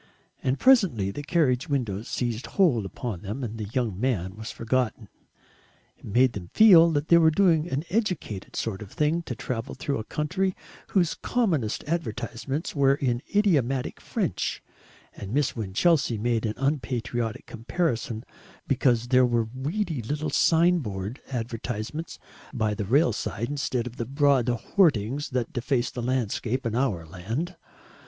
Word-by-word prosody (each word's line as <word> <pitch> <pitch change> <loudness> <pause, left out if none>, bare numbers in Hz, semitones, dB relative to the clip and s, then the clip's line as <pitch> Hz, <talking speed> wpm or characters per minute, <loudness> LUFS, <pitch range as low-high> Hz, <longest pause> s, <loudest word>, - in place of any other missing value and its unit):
And 130 +2 0
presently 185 - +4
the 145 - -5
carriage 145 -5 +1
windows 115 -7 -2
seized 120 -1 -2
hold 130 - +2
upon 100 -2 -5
them 105 +7 -5
and 115 -1 -5
the 105 - -3
young 115 -7 -1
man 100 -7 -1
was 110 +1 -7
forgotten. 115 -2 -1 0.9
It - - -17
made 125 +4 +3
them 90 -4 -7
feel 175 -7 +8
that 145 +1 -1
they 170 - +7
were 160 -1 +6
doing 165 -1 +3
an 140 0 -1
educated 180 - -2
sort 110 -3 -3
of 105 - -9
thing 155 +3 +1
to 130 -7 -6
travel 120 +3 -4
through 140 -2 -2
a - - -4
country 185 - -1 0.3
whose 175 -4 +2
commonest 165 - 0
advertisements 140 - -3
were 140 -1 +4
in 125 -4 -1
idiomatic 140 - +1
French, - - -2 0.5
and 100 +5 -6
Miss 145 -2 +1
Winchelsea 120 - +1
made 115 0 0
unpatriotic 120 -5 -2
comparisons 115 -2 -2 0.4
because 120 -3 +2
there 125 -1 +5
were 115 -2 0
weedy 155 - -2
little 150 +6 -3
sign 170 +4 +4
board 105 - -5
advertisements 120 +4 -4 0.3
by 110 -5 0
the 105 0 -3
rail 125 - +3
side 110 +2 -3
instead 130 -4 -1
of 125 0 -8
the 115 - -2
broad 140 -2 +2
hoardings 135 - +1
that 125 -3 -2
deface 125 -1 0
the 125 - -5
landscape 125 0 -1
in 115 - -1
our 115 -10 0
land. 110 - -4
125 Hz, 150 wpm, -26 LUFS, 115-150 Hz, 0.9 s, feel